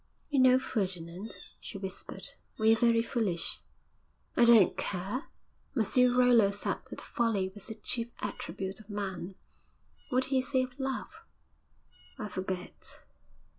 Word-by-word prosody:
'You 280 - +3
know, 255 0 +7
Ferdinand,' 190 -5 -3 0.2
she 200 - -7
whispered, 190 -1 -6 0.3
'we 220 0 +5
are - - -5
very 230 -1 +4
foolish.' 205 -8 0 0.8
'I 240 - +6
don't 230 -5 +7
care.' 200 - -2 0.5
'Monsieur 250 +3 +4
Rollo 245 -5 +6
said 200 +1 -2
that - - -7
folly 210 -5 0
was 200 -1 -8
the 220 - -5
chief 230 +2 -1
attribute 195 -1 -4
of 215 -1 -15
man.' 195 -3 -4 0.7
'What 255 +1 +3
did 260 - -3
he 265 -1 +3
say 260 0 +1
of 255 +1 -8
love?' 270 - -3 1.0
'I 215 -5 -4
forget.' 185 -1 -4
220 Hz, 135 wpm, -31 LUFS, 190-250 Hz, 1.0 s, know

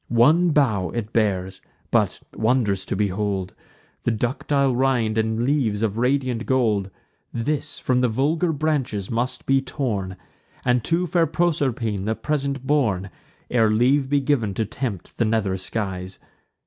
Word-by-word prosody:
One 150 +10 +4
bough 120 - +2
it 115 -2 -4
bears; 95 -4 0 0.3
but - - +1
wondrous 110 -5 +1
to - - -2
behold! 100 -1 -1 0.5
The - - 0
ductile 130 +3 0
rind 125 -4 +1
and 110 +1 0
leaves 120 -7 +1
of 105 -2 0
radiant 125 -2 0
gold: 110 -7 +1 0.4
This 140 +5 -2
from 125 -1 +1
the 125 - +3
vulgar 155 +9 +1
branches 140 -10 -1
must 120 +3 -2
be 135 0 +3
torn, 105 -9 -3 0.5
And 125 -2 +2
to 170 +2 +1
fair 170 0 +2
Proserpine 135 - 0
the 110 +1 0
present 140 -2 -2
borne, 110 -10 +1 0.4
Ere 115 -3 +4
leave 130 +5 +3
be 145 0 +3
giv'n 125 -8 0
to 110 - 0
tempt 110 -4 -5
the 115 - +3
nether 110 -4 +1
skies. 95 -1 -4
120 Hz, 145 wpm, -23 LUFS, 105-140 Hz, 0.5 s, One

